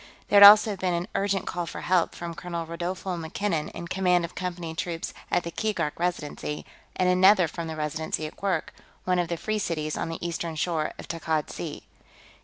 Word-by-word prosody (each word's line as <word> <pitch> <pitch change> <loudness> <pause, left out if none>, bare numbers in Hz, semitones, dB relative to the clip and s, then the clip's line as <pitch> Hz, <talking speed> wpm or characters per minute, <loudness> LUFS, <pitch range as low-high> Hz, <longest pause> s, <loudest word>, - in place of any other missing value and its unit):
There 200 - +6
had 200 - +15
also 210 0 +5
been 185 -2 -1
an 170 +2 -2
urgent 195 -2 0
call 175 -1 -3
for - - -6
help 180 -1 +1
from 170 -1 -5
Colonel 170 0 -5
Rodolfo 175 +3 -4
MacKinnon, 165 -1 -2
in 170 - -7
command 180 -1 +2
of 170 - -10
Company 175 -3 -4
troops 165 0 -4 0.2
at 175 - +1
the 170 - -5
Keegark 210 -5 -1
Residency, 150 -4 -3 0.3
and 185 - +1
another 185 0 +6
from 165 +1 -5
the 160 - -5
Residency 155 +1 -2
at 155 - -7
Kwurk, 190 -5 -2 0.3
one 180 -1 +1
of 175 - 0
the 170 0 -3
Free 215 +5 -2
Cities 155 -5 -2
on - - -3
the 165 +1 -4
eastern 170 -1 -3
shore 155 0 -1
of - - -9
Takkad 160 -2 -2
Sea. - - -6
170 Hz, 200 wpm, -26 LUFS, 160-185 Hz, 0.3 s, had